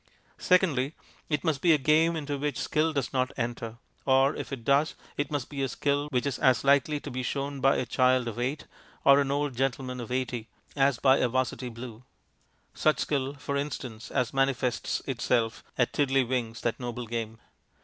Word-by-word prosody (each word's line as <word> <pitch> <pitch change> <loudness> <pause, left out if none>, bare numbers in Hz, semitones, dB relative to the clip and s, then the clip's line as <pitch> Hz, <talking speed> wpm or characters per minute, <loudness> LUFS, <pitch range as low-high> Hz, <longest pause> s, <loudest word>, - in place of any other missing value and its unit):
Secondly, 160 -7 +2 0.3
it 150 -3 0
must 155 -4 0
be 170 -2 +5
a - - +5
game 155 +4 +3
into 145 -2 -3
which 145 -2 -2
skill 160 +1 +1
does 140 -4 -2
not 130 0 +1
enter, 115 -2 -3 0.3
or, 135 +1 +4
if - - -6
it 125 -4 -6
does, 140 +3 +3 0.2
it 145 - -2
must 145 -5 -2
be 140 -2 -5
a 135 - +1
skill 145 +2 0
which 125 -4 0
is 140 - -2
as 130 -4 +3
likely 140 +2 +3
to - - -8
be 130 +1 -3
shown 140 +2 -3
by 135 +1 +4
a 130 - -1
child 125 +1 +2
of 115 +1 -5
eight 135 +5 -2 0.4
or 140 +1 +7
an 140 - -1
old 145 -1 -1
gentleman 130 0 -2
of 120 0 -7
eighty 125 -3 -2 0.3
as 140 -2 +3
by 135 +2 +5
a - - +2
'Varsity 130 0 -1
blue. 115 0 -9 0.7
Such 155 - +2
skill, 140 -1 -1
for 140 +1 -4
instance, 130 -5 -4
as 125 0 -1
manifests 135 -3 0
itself 120 -3 0
at 125 - +1
Tiddleywinks, 130 -4 0
that 120 - -1
noble 120 -1 -4
game. 115 -1 -4
135 Hz, 190 wpm, -28 LUFS, 125-145 Hz, 0.7 s, or